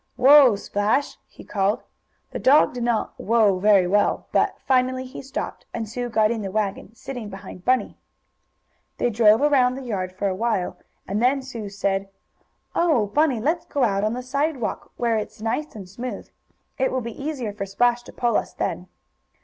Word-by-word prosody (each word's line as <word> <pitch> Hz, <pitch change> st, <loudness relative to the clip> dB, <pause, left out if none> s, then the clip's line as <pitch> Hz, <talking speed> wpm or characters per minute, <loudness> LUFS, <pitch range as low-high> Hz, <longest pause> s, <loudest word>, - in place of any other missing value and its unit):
Whoa, 270 Hz, -3 st, +7 dB
Splash!" 205 Hz, +7 st, -1 dB
he -, -, -14 dB
called. 205 Hz, +3 st, 0 dB, 0.5 s
The -, -, -4 dB
dog 285 Hz, +1 st, +5 dB
did 245 Hz, -, -5 dB
not 235 Hz, -2 st, 0 dB
"whoa" 215 Hz, -4 st, +2 dB
very 200 Hz, -2 st, +5 dB
well, 205 Hz, +3 st, +1 dB
but -, -, +2 dB
finally 255 Hz, 0 st, +1 dB
he 255 Hz, -, -9 dB
stopped, 270 Hz, 0 st, -6 dB
and 225 Hz, -1 st, -3 dB
Sue 245 Hz, +3 st, -4 dB
got 220 Hz, -1 st, +2 dB
in 230 Hz, -2 st, -2 dB
the 195 Hz, -, -4 dB
wagon, 205 Hz, +1 st, -3 dB
sitting 240 Hz, -3 st, -7 dB
behind 195 Hz, -2 st, -10 dB
Bunny. 255 Hz, 0 st, +1 dB, 1.0 s
They 240 Hz, -, +1 dB
drove 220 Hz, +3 st, +5 dB
around 260 Hz, -4 st, +3 dB
the 270 Hz, -, -7 dB
yard 190 Hz, -7 st, -3 dB
for 190 Hz, +2 st, -2 dB
a 190 Hz, -, 0 dB
while, 210 Hz, -2 st, -1 dB, 0.3 s
and 205 Hz, +3 st, -1 dB
then 265 Hz, +2 st, +2 dB
Sue 230 Hz, -6 st, -7 dB
said: 195 Hz, -1 st, -2 dB, 0.6 s
"Oh, 310 Hz, -11 st, +2 dB
Bunny, 295 Hz, -6 st, +2 dB
let's 320 Hz, +9 st, -1 dB
go 280 Hz, -, 0 dB
out 200 Hz, -4 st, +1 dB
on 215 Hz, +1 st, +1 dB
the 250 Hz, +1 st, -5 dB
sidewalk, 275 Hz, 0 st, -2 dB
where 235 Hz, -2 st, +1 dB
it's 215 Hz, +1 st, -5 dB
nice 225 Hz, +7 st, -3 dB
and 195 Hz, -4 st, -8 dB
smooth. 245 Hz, +7 st, -6 dB, 0.5 s
It 265 Hz, -, +1 dB
will 260 Hz, -, -1 dB
be 235 Hz, +3 st, -7 dB
easier 265 Hz, -9 st, -3 dB
for 200 Hz, -1 st, -5 dB
Splash 240 Hz, +5 st, +2 dB
to 240 Hz, -, -13 dB
pull 240 Hz, -1 st, +1 dB
us -, -, -3 dB
then." -, -, -3 dB
235 Hz, 180 wpm, -23 LUFS, 205-255 Hz, 1.0 s, Whoa